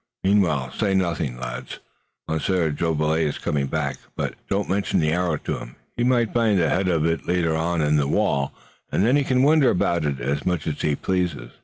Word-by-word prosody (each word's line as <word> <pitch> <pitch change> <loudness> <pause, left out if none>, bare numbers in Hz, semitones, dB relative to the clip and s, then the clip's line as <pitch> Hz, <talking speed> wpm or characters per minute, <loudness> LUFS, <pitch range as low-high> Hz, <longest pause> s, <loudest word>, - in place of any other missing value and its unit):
Meanwhile, 85 -10 +2
say 100 - 0
nothing, 85 -9 -1
lads. 60 +1 -6 0.5
Monsieur 80 +1 0
Jolivet 80 0 0
is 75 -3 0
coming 70 -2 -1
back, 70 -1 -2 0.2
but - - -2 0.2
don't 100 0 0
mention 100 +2 0
the 75 -1 +1
arrow 85 -2 0
to - - -4
him. - - -10 0.2
He 120 - -1
may 120 -1 +3
find 110 -2 +1
the 85 -3 +2
head 95 0 +1
of 80 -4 +1
it 80 0 -1
later 85 -2 +1
on 85 +1 0
in 75 0 +3
the 70 -2 +1
wall, 70 -6 +1 0.4
and 100 - +2
then 125 +4 +4
he 145 - +3
can 130 -1 +2
wonder 150 -1 +5
about 85 -2 +1
it 70 -3 -1
as 70 +4 -2
much 90 -4 -1
as 75 -2 -3
he 75 -2 +1
pleases." 90 -10 -2
80 Hz, 205 wpm, -23 LUFS, 75-95 Hz, 0.5 s, wonder